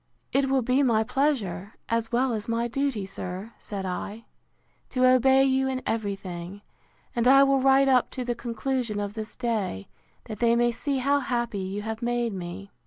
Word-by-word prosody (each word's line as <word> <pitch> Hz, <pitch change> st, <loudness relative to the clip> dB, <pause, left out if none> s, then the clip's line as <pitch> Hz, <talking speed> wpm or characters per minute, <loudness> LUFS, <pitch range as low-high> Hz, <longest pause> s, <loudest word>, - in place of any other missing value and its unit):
It 270 Hz, 0 st, +2 dB
will 265 Hz, -2 st, +2 dB
be 255 Hz, +4 st, +2 dB
my 230 Hz, -5 st, +3 dB
pleasure, 230 Hz, -7 st, -1 dB
as 230 Hz, 0 st, -1 dB
well 250 Hz, +1 st, +2 dB
as 215 Hz, +1 st, -4 dB
my 230 Hz, +1 st, 0 dB
duty, 260 Hz, -4 st, -1 dB
sir, 190 Hz, +3 st, -6 dB
said 195 Hz, -2 st, -5 dB
I, 200 Hz, +4 st, -5 dB, 0.6 s
to 255 Hz, 0 st, +2 dB
obey 265 Hz, +1 st, +5 dB
you 265 Hz, 0 st, +2 dB
in 260 Hz, -1 st, -2 dB
every 210 Hz, -3 st, -1 dB
thing: 185 Hz, +1 st, -8 dB, 0.5 s
and 235 Hz, 0 st, +2 dB
I 275 Hz, +1 st, +8 dB
will 275 Hz, -1 st, +3 dB
write 270 Hz, +1 st, +5 dB
up 255 Hz, -2 st, +4 dB
to 250 Hz, -, -2 dB
the 240 Hz, -, 0 dB
conclusion 235 Hz, -1 st, -2 dB
of 205 Hz, 0 st, -3 dB
this 220 Hz, 0 st, -6 dB
day, 215 Hz, -, -2 dB, 0.3 s
that 215 Hz, -3 st, -8 dB
they 235 Hz, -1 st, +4 dB
may 240 Hz, 0 st, +3 dB
see 275 Hz, +4 st, -2 dB
how 280 Hz, +2 st, +2 dB
happy 240 Hz, -5 st, -2 dB
you 195 Hz, +2 st, -4 dB
have 220 Hz, 0 st, -4 dB
made 240 Hz, -2 st, 0 dB
me. 190 Hz, +2 st, -7 dB
235 Hz, 185 wpm, -26 LUFS, 205-260 Hz, 0.6 s, I